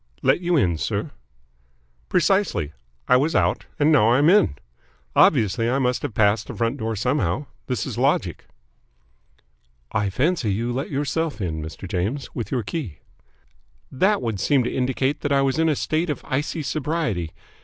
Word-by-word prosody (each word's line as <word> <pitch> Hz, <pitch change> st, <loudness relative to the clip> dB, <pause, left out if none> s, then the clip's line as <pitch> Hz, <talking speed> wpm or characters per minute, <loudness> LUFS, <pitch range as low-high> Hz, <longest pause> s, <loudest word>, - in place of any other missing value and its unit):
"Let -, -, +3 dB
you 175 Hz, -1 st, +2 dB
in, 85 Hz, -, +2 dB
sir?" -, -, -2 dB, 1.0 s
"Precisely. 180 Hz, -, +1 dB, 0.3 s
I 125 Hz, -, +6 dB
was 150 Hz, +5 st, 0 dB
out -, -, +1 dB
and 150 Hz, +1 st, +3 dB
now 125 Hz, -8 st, +5 dB
I 120 Hz, -, +4 dB
am 150 Hz, +5 st, +5 dB
in. 200 Hz, -, +4 dB, 0.6 s
Obviously 115 Hz, +2 st, +4 dB
I 130 Hz, -, +1 dB
must 125 Hz, -2 st, 0 dB
have 110 Hz, -, -5 dB
passed 105 Hz, +1 st, +2 dB
the -, -, -7 dB
front 115 Hz, +3 st, -1 dB
door 110 Hz, -2 st, -2 dB
somehow. 110 Hz, -, 0 dB, 0.2 s
This 125 Hz, -3 st, -2 dB
is -, -, -5 dB
logic." -, -, 0 dB, 1.5 s
"I 100 Hz, -1 st, 0 dB
fancy 135 Hz, -, 0 dB
you 115 Hz, +5 st, -1 dB
let 135 Hz, +3 st, -3 dB
yourself 145 Hz, +1 st, -2 dB
in, 80 Hz, -5 st, -3 dB
Mr. 80 Hz, +5 st, -7 dB
James, 100 Hz, +11 st, -3 dB
with 115 Hz, -, -4 dB
your 125 Hz, -4 st, 0 dB
key." 125 Hz, -, -5 dB, 0.9 s
"That 195 Hz, +10 st, +2 dB
would 110 Hz, -4 st, -2 dB
seem 130 Hz, +6 st, +2 dB
to 120 Hz, -, -3 dB
indicate 130 Hz, +2 st, 0 dB
that 145 Hz, -, -2 dB
I 140 Hz, -1 st, +3 dB
was 135 Hz, +3 st, 0 dB
in 165 Hz, 0 st, +3 dB
a 150 Hz, -, +2 dB
state 155 Hz, +5 st, -1 dB
of 145 Hz, -, -4 dB
icy 150 Hz, +3 st, -2 dB
sobriety. 145 Hz, -, -2 dB
130 Hz, 170 wpm, -23 LUFS, 110-150 Hz, 1.5 s, I